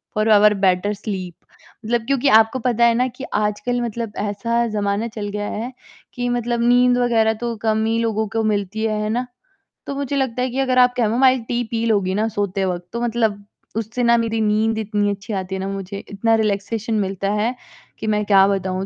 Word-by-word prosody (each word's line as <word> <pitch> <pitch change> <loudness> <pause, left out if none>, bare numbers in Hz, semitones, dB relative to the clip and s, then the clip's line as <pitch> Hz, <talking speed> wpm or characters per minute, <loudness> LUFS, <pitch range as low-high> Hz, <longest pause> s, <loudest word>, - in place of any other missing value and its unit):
For 215 +1 +1
our 210 0 +6
better 185 +3 +2
sleep, 185 -4 -5 0.5
मतलब 230 0 0
क्योंकि 275 0 +1
आपको 225 +4 -3
पता 235 -1 +2
है 235 - +5
ना 250 +2 +2
कि 255 +2 -8
आजकल 210 +4 0
मतलब 230 -2 -4
ऐसा 230 +4 -1
ज़माना 205 +1 -1
चल 210 -2 -5
गया 205 0 -3
है, 240 +4 -5 0.4
कि 245 0 -2
मतलब 240 -1 -1
नींद 245 0 +4
वगैरह 225 -2 +2
तो 235 -1 -2
कम 220 0 +1
ही 225 +1 +1
लोगों 220 -1 0
को 225 +2 -1
मिलती 210 0 -1
है, 215 -1 -1
है 210 - -2
ना? 245 +3 -1 0.6
तो 280 - -3
मुझे 280 0 -3
लगता 255 -3 -1
है 255 - 0
कि 260 +3 -3
अगर 255 -1 +1
आप 250 0 +5
कैमोमाइल 250 +3 +3
टी 240 0 -1
पी 230 0 -1
लोगी 200 -4 +1
ना 215 +2 +1
सोते 200 -2 -1
वक़्त 175 -1 -3
तो 235 - -3
मतलब 225 -4 0 0.3
उससे 225 +3 -2
ना 235 0 +5
मेरी 225 -1 -1
नींद 220 +1 +1
इतनी 205 -1 0
अच्छी 200 +2 -6
आती 190 0 -3
है - - -4
ना, 195 - -3
मुझे 195 0 -5
इतना 225 +3 +1
रिलैक्सेशन 215 +1 -1
मिलता 195 0 -2
है, 225 +4 0 0.4
कि 220 - -4
मैं 210 0 +1
क्या 195 -1 +5
बताऊँ। 190 -1 -1
220 Hz, 205 wpm, -20 LUFS, 205-235 Hz, 0.6 s, our